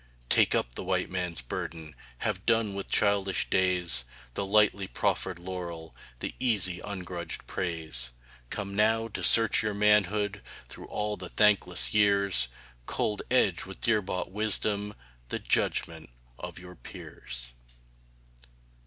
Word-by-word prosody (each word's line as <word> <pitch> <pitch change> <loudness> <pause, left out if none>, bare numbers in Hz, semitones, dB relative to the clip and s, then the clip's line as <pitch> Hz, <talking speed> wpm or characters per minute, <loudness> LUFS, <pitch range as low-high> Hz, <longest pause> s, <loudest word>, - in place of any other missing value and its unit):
Take - - +4
up - - -1
the - - -6
White 90 -1 -1
Man's 90 -6 -3
burden 80 +5 -6 0.3
Have 95 - -1
done 115 -3 +2
with 100 0 -5
childish 100 -2 +2
days 90 -7 +2 0.3
The 100 - -2
lightly 100 -1 +3
proffered 95 -1 -1
laurel 85 -2 -7 0.3
The - - -3
easy, 100 -8 +3
ungrudged 90 -4 -6
praise. 80 -8 -3 0.4
Comes 100 -2 -5
now, 110 +2 +2
to - - -5
search 115 -1 +7
your 105 -1 -1
manhood 105 0 +2 0.3
Through - - -10
all 105 0 -2
the 90 -1 -6
thankless 105 -2 +2
years, 100 - +3 0.4
Cold, 105 -1 -1
edged 100 -9 +2
with 95 - -9
dear 110 -2 +2
bought 90 -1 -4
wisdom, 105 0 0 0.3
The - - -2
judgment 80 -1 0 0.3
of - - -7
your 90 0 -10
peers! - - -8
95 Hz, 130 wpm, -28 LUFS, 90-105 Hz, 0.4 s, search